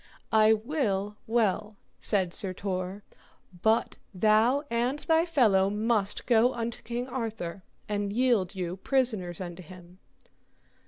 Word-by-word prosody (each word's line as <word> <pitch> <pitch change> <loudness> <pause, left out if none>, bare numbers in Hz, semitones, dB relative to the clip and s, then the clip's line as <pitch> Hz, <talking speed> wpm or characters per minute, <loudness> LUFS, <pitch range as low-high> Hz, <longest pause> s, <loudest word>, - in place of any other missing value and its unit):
I 220 0 +6
will 215 -5 -1
well, 215 -2 0 0.2
said 190 -5 +2
Sir 190 -2 +1
Tor, 185 +1 -4 0.6
but 220 +1 +1 0.2
thou 220 +8 +3
and 240 +4 0
thy 325 +3 +1
fellow 210 - +3
must 210 -1 0
go 240 +1 +3
unto 235 0 -4
King 240 +1 -4
Arthur, 225 -8 -5 0.3
and 205 -1 -2
yield 225 -5 +1
you 180 -1 -4
prisoners 215 - 0
unto 175 -1 -7
him. 180 +1 -14
215 Hz, 120 wpm, -28 LUFS, 190-235 Hz, 0.6 s, I